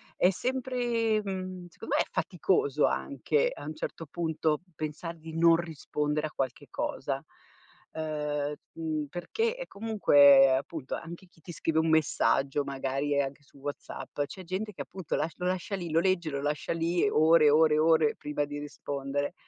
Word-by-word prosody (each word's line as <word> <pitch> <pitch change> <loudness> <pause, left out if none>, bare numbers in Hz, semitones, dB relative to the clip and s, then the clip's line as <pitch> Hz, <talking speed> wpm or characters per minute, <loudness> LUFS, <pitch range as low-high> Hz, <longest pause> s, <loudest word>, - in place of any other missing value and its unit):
è 180 - +4
sempre 240 0 0
mhmm, 185 -2 -5
secondo 170 - -4
me - - +4
è - - -15
faticoso 430 0 +1
anche 485 +2 0
a - - -9
un 155 - -5
certo 165 +1 -5
punto 160 0 -1
pensar 155 +3 -5
di 160 0 -9
non 165 0 +6
rispondere 150 -2 -2
a - - -12
qualche 130 -4 -3
cosa. - - -3 0.7
Uhm, 150 -2 -2 0.2
mhmm, 155 -2 -2
perché 450 - -1
è - - -7
comunque 145 -11 +6
appunto 140 +1 -4
anche 170 +3 -9
chi 170 -2 -26
ti 175 - -9
scrive 160 -1 0
un 160 0 +2
messaggio, 140 -2 +2
magari, 140 +1 -2
ehm, 140 - +4
anche 135 +1 -8
su 140 - -22
WhatsApp, 145 +1 -6
c'è 185 +6 -10
gente 190 +5 -3
che - - -7
appunto 185 -5 -5
lasc 160 - -2
lo 180 - -1
lascia 185 +2 -1
lì, 175 -4 -5
lo 165 - +4
legge, 175 -3 +1
lo 140 -1 -3
lascia 150 0 -2
lì 170 +2 +1
ore, 160 -3 +5
ore, 155 +1 +5
ore 160 -1 +4
prima 145 0 -2
di 145 0 -6
rispondere. 145 0 -3
160 Hz, 170 wpm, -29 LUFS, 145-180 Hz, 0.7 s, non